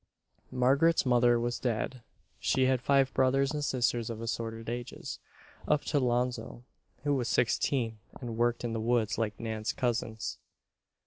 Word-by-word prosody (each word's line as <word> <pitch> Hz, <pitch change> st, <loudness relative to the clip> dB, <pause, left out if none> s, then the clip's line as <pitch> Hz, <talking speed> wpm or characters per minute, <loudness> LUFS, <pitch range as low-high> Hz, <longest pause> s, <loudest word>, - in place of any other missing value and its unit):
Margaret's 135 Hz, +7 st, +3 dB
mother 120 Hz, -1 st, +4 dB
was 120 Hz, +1 st, -2 dB
dead. 120 Hz, +1 st, -2 dB, 0.4 s
She 130 Hz, -, +2 dB
had 130 Hz, -1 st, +2 dB
five 135 Hz, 0 st, +3 dB
brothers 135 Hz, +1 st, +3 dB
and 150 Hz, -1 st, -2 dB
sisters 120 Hz, -4 st, 0 dB
of 115 Hz, -1 st, -5 dB
assorted 115 Hz, -1 st, -4 dB
ages, 120 Hz, +2 st, -5 dB, 0.5 s
up 150 Hz, -1 st, +2 dB
to 145 Hz, -, +1 dB
'Lonzo, 125 Hz, -1 st, -1 dB, 0.4 s
who 145 Hz, 0 st, +2 dB
was 125 Hz, -4 st, 0 dB
sixteen 115 Hz, -2 st, +1 dB, 0.2 s
and 120 Hz, -3 st, -5 dB
worked 120 Hz, +1 st, +1 dB
in 120 Hz, -1 st, -2 dB
the 115 Hz, -, -1 dB
woods 115 Hz, -2 st, +1 dB
like 110 Hz, -2 st, -2 dB
Nan's 110 Hz, -1 st, -2 dB
cousins. 115 Hz, -3 st, -2 dB
120 Hz, 145 wpm, -30 LUFS, 115-130 Hz, 0.5 s, mother